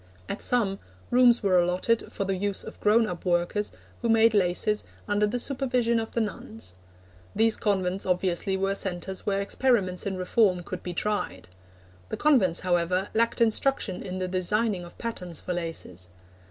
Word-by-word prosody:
At - - -4
some, 205 -6 +1 0.3
rooms 245 -2 +5
were 185 -2 +4
allotted 180 +6 0
for 200 - -3
the 195 0 0
use 200 +1 -2
of - - -10
grown 225 +2 +4
up 180 -4 -5
workers 175 +3 0 0.3
who 235 - 0
made 225 0 +5
laces 205 +2 +1 0.2
under 205 0 +2
the 230 +4 -1
supervision 245 -3 0
of 225 - -5
the 235 - +1
nuns. 110 - -5 0.6
These 225 +1 +4
convents 190 -2 0
obviously 185 +1 0
were 195 +1 0
centres 190 0 -4
where 200 -1 +1
experiments 200 -4 +1
in 190 -1 -2
reform 185 -1 +2
could 185 +1 -6
be 175 -1 -6
tried. 95 - -2 0.6
The - - -3
convents, 225 - +3
however, 180 +1 +1
lacked 230 +1 +1
instruction 225 -4 +1
in 185 -1 -5
the 185 0 -2
designing 190 +2 0
of 175 - -14
patterns 180 -8 -5
for 180 - -4
laces. 165 - -5
195 Hz, 165 wpm, -27 LUFS, 180-225 Hz, 0.6 s, rooms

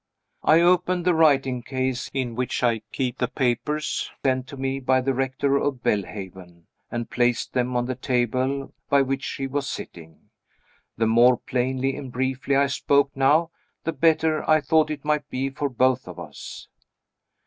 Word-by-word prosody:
I 160 +2 +5
opened 180 0 +2
the 180 - +4
writing 135 -6 +3
case 130 0 -2
in 130 -3 -2
which 125 +1 -2
I 115 -2 +2
keep 125 -3 -2
the 125 - +1
papers 130 +4 -1 0.2
sent 130 -1 +1
to 140 +1 -9
me 135 0 -2
by 130 0 +2
the 135 +1 0
Rector 135 +2 0
of 140 -3 -2
Belhaven, 95 -3 -4 0.3
and 120 -1 -4
placed 120 -1 0
them 125 0 0
on 120 - 0
the 130 - -2
table 130 +2 -1 0.2
by 140 -1 +4
which 135 +1 -2
she 135 - -4
was 140 +1 -2
sitting. 80 -2 -9 0.7
The 115 - +2
more 120 +3 +5
plainly 130 +1 -1
and 135 -3 -7
briefly 130 +2 -1
I 140 +1 +4
spoke 140 +1 +2
now, 150 +5 +3 0.3
the 165 - -2
better 160 -1 +2
I 155 0 +6
thought 155 +1 +2
it 150 -2 -5
might 150 -1 0
be 135 +1 -2
for 140 +1 -2
both 130 -1 +1
of 90 -1 -9
us. 80 -4 -9
130 Hz, 170 wpm, -24 LUFS, 125-140 Hz, 0.7 s, I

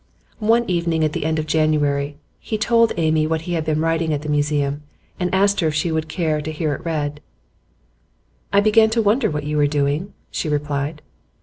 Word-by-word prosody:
One 230 +2 +2
evening 170 -3 0
at 155 -1 0
the - - -3
end 160 0 0
of 155 - -1
January 150 -2 +1 0.2
he 215 - -3
told 230 +1 +3
Amy 155 -2 +2
what 160 0 -1
he 175 +2 -4
had 165 -2 0
been 155 -1 0
writing 165 0 0
at 145 - -5
the 150 - -5
Museum, 145 -1 0 0.4
and 180 -1 -1
asked 200 +1 +3
her 165 - +2
if 155 - -1
she 160 +2 0
would 160 0 -2
care 155 -3 -1
to 155 +1 -4
hear 155 -1 -1
it - - -7
read. 150 -3 -3 1.3
'I 200 +1 +5
began 220 +1 +5
to 225 +1 +1
wonder 215 +6 +2
what 150 -1 -3
you 150 +1 -2
were 145 -1 +4
doing,' 145 +5 -1 0.2
she 155 - -2
replied. 150 +1 -2
155 Hz, 205 wpm, -21 LUFS, 150-175 Hz, 1.3 s, I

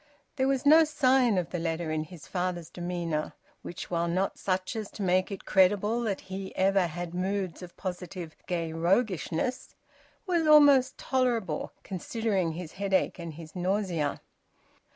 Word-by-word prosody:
There 265 -2 +1
was 270 0 0
no 315 +3 +8
sign 260 -7 +3
of 175 -3 -1
the 175 - -2
letter 165 -1 -2
in 155 0 -1
his 165 -1 -12
father's 180 -3 -3
demeanour, 175 -3 -3 0.3
which, 175 - -8
while 170 0 +1
not 185 +3 -1
such 185 +3 -1
as 215 -2 -4
to 205 - -5
make 185 +2 +2
it 195 - -7
credible 205 +4 +3
that 210 -5 -2
he 190 0 -7
ever 195 -1 +3
had 175 +1 -6
moods 190 0 -2
of 180 -1 -11
positive 180 -3 -6
gay 170 -3 -2
roguishness, 185 +5 0 0.5
was 340 -4 +1
almost 285 -3 +6
tolerable, 250 -6 0
considering 195 -2 -1
his 165 -1 -7
headache 195 -1 0
and 165 -3 -6
his 160 +1 -11
nausea. 180 -5 -1
185 Hz, 150 wpm, -28 LUFS, 175-220 Hz, 0.5 s, no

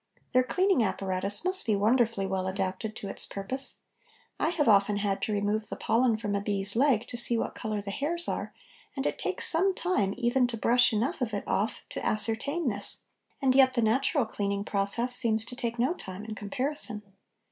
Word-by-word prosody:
Their 255 - +3
cleaning 365 - 0
apparatus 195 - 0
must 375 +1 +10
be 215 - +1
wonderfully 220 0 0
well 190 -1 -3
adapted 195 +3 -4
to 200 - -8
its - - +6
purpose. 260 +8 0 0.6
I - - 0
have 320 -4 -1
often 205 -1 +3
had 200 -1 -2
to - - -2
remove 210 +1 -2
the - - -6
pollen 235 -1 0
from 210 -2 -5
a 200 - -2
bee's 200 0 -1
leg 245 -3 +1
to 240 - -7
see 235 0 +5
what - - -4
colour 215 -3 -5
the 200 0 -7
hairs 335 +10 -3
are, - - -4 0.4
and 270 0 -4
it - - -3
takes - - -1
some 370 +3 +2
time 205 - -1
even 245 +1 +1
to 235 -1 -6
brush 245 +3 +3
enough 230 +5 -2
of 225 -4 -3
it 200 - -4
off 210 +3 -2
to - - -7
ascertain 230 +9 -2
this, 205 -3 +2 0.4
and 260 -1 +3
yet 260 -1 +4
the 235 - +1
natural 260 +4 +1
cleaning 200 -2 -4
process 215 +5 +1
seems 220 -3 +3
to 245 - -8
take 235 -2 -4
no 255 +7 0
time 195 - -9
in 220 - -7
comparison. 220 +1 0
225 Hz, 200 wpm, -27 LUFS, 205-255 Hz, 0.6 s, must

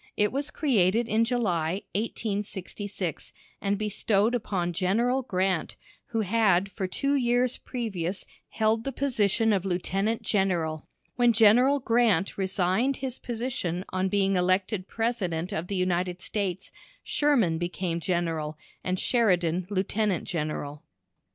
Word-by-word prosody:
It 210 0 +2
was 280 +2 -2
created 225 - +2
in 225 +1 +2
July, 190 -7 0
1866, 205 -4 -4 0.3
and 200 0 0
bestowed 210 +1 +1
upon 190 -7 -1
General 230 +9 +1
Grant, 185 -6 -1 0.3
who 225 -1 -1
had 200 -2 +2
for 190 0 -3
two 275 +9 -1
years 245 -2 +2
previous 200 -7 -4 0.2
held 220 0 +1
the 275 - -2
position 225 -5 +2
of 190 -3 +1
Lieutenant 195 +4 -1
General. 175 -6 0 0.3
When 240 -1 +5
General 240 +6 +5
Grant 230 -7 +2
resigned 190 +7 +1
his 260 -1 -4
position 225 -7 -3
on 185 0 0
being 195 0 +2
elected 185 +2 +1
President 190 -8 -2
of 165 +3 -3
the 200 - -3
United 180 -1 0
States, 190 -2 -3 0.3
Sherman 235 - +2
became 175 0 -2
General, 165 -3 -2 0.3
and 185 0 -1
Sheridan 180 -7 +2
Lieutenant 200 -1 0
General. 150 -3 -4
195 Hz, 125 wpm, -27 LUFS, 180-230 Hz, 0.3 s, When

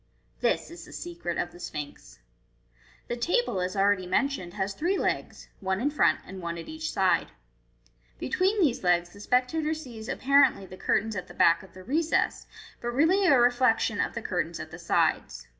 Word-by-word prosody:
This - - 0
is 340 - -10
the - - -13
secret 335 - -5
of 175 - -2
the 175 - -14
Sphinx. 150 -4 -7 0.9
The 240 - -2
table, 290 - 0
as 185 +2 -2
already 195 -2 +2
mentioned, 185 -4 -1
has 195 -1 -2
three 350 - 0
legs, - - -2
one 190 0 -1
in 285 +6 0
front, 300 - +3
and 190 0 -9
one 170 0 -4
at 165 - -8
each 315 0 -4
side. 190 -1 +2 0.9
Be - - -5
tween 390 +4 +1
these 285 - +2
legs 175 -1 +2
the 200 - -14
spectator 280 +8 +1
sees 240 -6 -9
apparently 275 -8 +3
the 185 - -11
curtains 215 +3 0
at 185 - -5
the - - -13
back 170 +3 +4
of 190 -2 -16
the 185 - -11
recess, 315 - 0 0.3
but 240 - -4
really 365 +7 +4
a 275 -6 +6
reflection 245 +1 +3
cf - - -1
the - - -4
curtains - - -2
at - - -7
the - - -9
sides. - - 0
235 Hz, 190 wpm, -27 LUFS, 185-305 Hz, 0.9 s, a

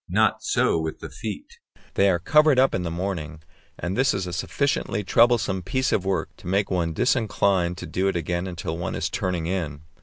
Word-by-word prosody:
Not - - +2
so - - +2
with 80 0 -3
the - - -8
feet; - - -7 0.3
they 100 0 +4
are 90 - +3
covered 150 - +4
up 130 +1 +4
in 95 - 0
the 85 - -3
morning, 85 -3 -4 0.3
and 85 +4 -3
this 135 +2 +2
is 95 -2 -2
a 90 - -5
sufficiently 120 - -1
troublesome 115 -2 +3
piece 130 +8 -1
of 95 - +1
work 95 -4 -1
to - - -12
make 100 +2 +1
one 85 -3 0
disinclined 100 - +1
to 90 - -6
undo 90 +4 -1
it 95 - 0
again 85 +2 -2
until 85 -2 -4
one 85 - -3
is - - -2
turning 90 -3 -1
in. 80 -5 -3
95 Hz, 205 wpm, -24 LUFS, 85-100 Hz, 0.3 s, they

